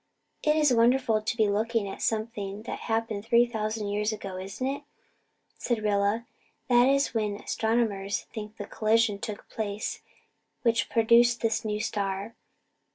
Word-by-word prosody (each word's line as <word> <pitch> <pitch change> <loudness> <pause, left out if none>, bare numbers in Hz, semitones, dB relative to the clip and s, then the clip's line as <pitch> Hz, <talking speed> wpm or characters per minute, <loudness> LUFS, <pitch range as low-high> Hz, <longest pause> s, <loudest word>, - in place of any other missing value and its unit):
"It's 300 -2 +3
wonderful 235 -1 +3
to 215 +2 -2
be 215 -2 +4
looking 220 +1 0
at 195 - -7
something 215 -2 -2
that - - -5
happened 225 -2 -1
three 235 +2 +4
thousand 215 -2 -3
years 210 +1 0
ago, 200 -3 -6
isn't 195 +7 -5
it?" 275 +2 -2 0.8
said 235 -3 -1
Rilla. 205 +2 +1 0.4
"That 245 0 +6
is 275 +1 +2
when 210 -3 0
astronomers 220 -2 -1
think 215 -1 -7
the 205 - -5
collision 215 -1 +2
took 210 0 -6
place 210 -1 -4 0.6
which 230 -3 +2
produced 235 +1 +4
this 225 -1 0
new 210 -1 -2
star. 200 -1 -2
220 Hz, 145 wpm, -28 LUFS, 205-235 Hz, 0.8 s, That